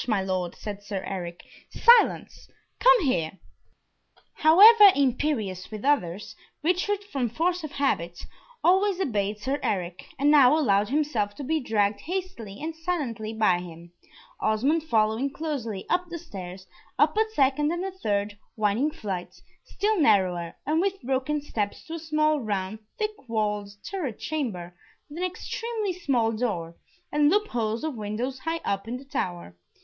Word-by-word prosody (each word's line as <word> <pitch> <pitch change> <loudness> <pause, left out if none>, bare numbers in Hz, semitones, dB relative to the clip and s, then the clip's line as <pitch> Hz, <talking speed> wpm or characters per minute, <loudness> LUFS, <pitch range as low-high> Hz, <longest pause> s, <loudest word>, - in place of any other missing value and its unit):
my 215 -4 +2
Lord," 185 -2 -2
said 205 -1 -7
Sir 200 -2 -5
Eric. 175 -3 -6 0.3
"Silence! 475 +1 +4 0.3
come - - +6
here." 170 - 0 1.0
However 410 +7 +8
imperious 250 -9 0
with 215 +2 -7
others, 205 -10 0 0.3
Richard 380 +4 0
from 275 - -2
force 345 +7 -1
of 310 - -6
habit 175 -12 -1 0.4
always 380 +2 +3
obeyed 210 - -1
Sir 265 +7 -2
Eric, 180 -2 -3
and 285 +2 +3
now 290 0 +6
allowed 205 -8 +2
himself 250 -8 0
to 285 - -7
be 315 +4 0
dragged 210 -5 0
hastily 325 - -5
and 320 +2 -5
silently 285 -11 -3
by 215 -5 +2
him, 170 -1 -11 0.5
Osmond 260 +10 +1
following 220 0 +1
closely, 270 -10 -4
up 360 0 0
the 345 - -5
stairs, 185 - -9 0.3
up - - +3
a 440 +1 +2
second 285 +3 +2
and 345 +2 -2
a 385 - -3
third 205 - -2 0.2
winding 215 +7 +1
flight, 195 -10 -6 0.3
still 420 -1 0
narrower, 180 - +2
and 315 +3 +1
with 390 0 -1
broken 270 +3 -1
steps, 210 -8 -3
to 325 - -8
a 330 - -4
small 305 -1 +1
round, 205 -3 -3 0.2
thick 430 0 -1 0.2
walled 210 -2 -1 0.2
turret 310 - -4
chamber, 210 - -4 0.3
with 300 +3 -8
an - - -2
extremely 425 +3 -3
small 260 -10 0
door, 205 -8 -3 0.4
and 295 0 +4
loop 420 +4 +2
holes 225 0 -2
of 315 -2 -2
windows 230 +4 -4
high 325 +4 -3
up 200 +1 -2
in 240 +2 -3
the 270 - -13
tower. 175 - -4
255 Hz, 155 wpm, -26 LUFS, 205-320 Hz, 1.0 s, However